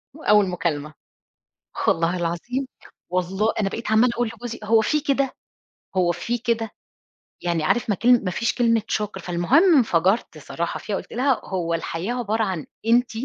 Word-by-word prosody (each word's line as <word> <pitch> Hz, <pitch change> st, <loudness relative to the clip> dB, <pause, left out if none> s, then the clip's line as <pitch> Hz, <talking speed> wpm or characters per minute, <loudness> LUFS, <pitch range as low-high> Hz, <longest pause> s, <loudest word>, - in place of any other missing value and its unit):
وأوَّل 210 Hz, -10 st, +3 dB
مكالمة، 155 Hz, -4 st, -2 dB, 0.8 s
خ -, -, -2 dB
والله 165 Hz, +2 st, +2 dB
العظيم، 175 Hz, +11 st, -2 dB, 0.4 s
والله 190 Hz, +4 st, 0 dB
أنا 195 Hz, -, +1 dB
بقيت 230 Hz, +2 st, -5 dB
عمَّالة 235 Hz, +3 st, +5 dB
أقول 240 Hz, -1 st, 0 dB
لجوزي: 235 Hz, 0 st, -7 dB
"هو 220 Hz, +1 st, +4 dB
في 300 Hz, +7 st, +1 dB
كده، 275 Hz, -2 st, 0 dB, 0.6 s
هو 175 Hz, -1 st, +3 dB
في 235 Hz, +8 st, -2 dB
كده." 225 Hz, -2 st, -1 dB, 0.7 s
يعني 170 Hz, -2 st, 0 dB
عارِف، 230 Hz, +8 st, +1 dB
ما 205 Hz, -, +2 dB
كان 240 Hz, +2 st, +4 dB
ما 185 Hz, -, 0 dB
فيش 230 Hz, +6 st, 0 dB
كلمة 230 Hz, -2 st, +2 dB
شُكر. 210 Hz, -2 st, -2 dB
فالمهم 185 Hz, -, +3 dB
انفجَرت 190 Hz, -, +2 dB
صراحة 165 Hz, +3 st, -4 dB
فيها، 210 Hz, -, -3 dB
قُلت -, -, -7 dB
لها: 260 Hz, +2 st, +1 dB
"هو 170 Hz, -3 st, -2 dB
الحياة 165 Hz, +6 st, -3 dB
عبارة 225 Hz, -2 st, -1 dB
عن 185 Hz, -6 st, -3 dB, 0.2 s
أنتِ؟" 240 Hz, +2 st, +3 dB
210 Hz, 165 wpm, -23 LUFS, 175-240 Hz, 0.8 s, عمَّالة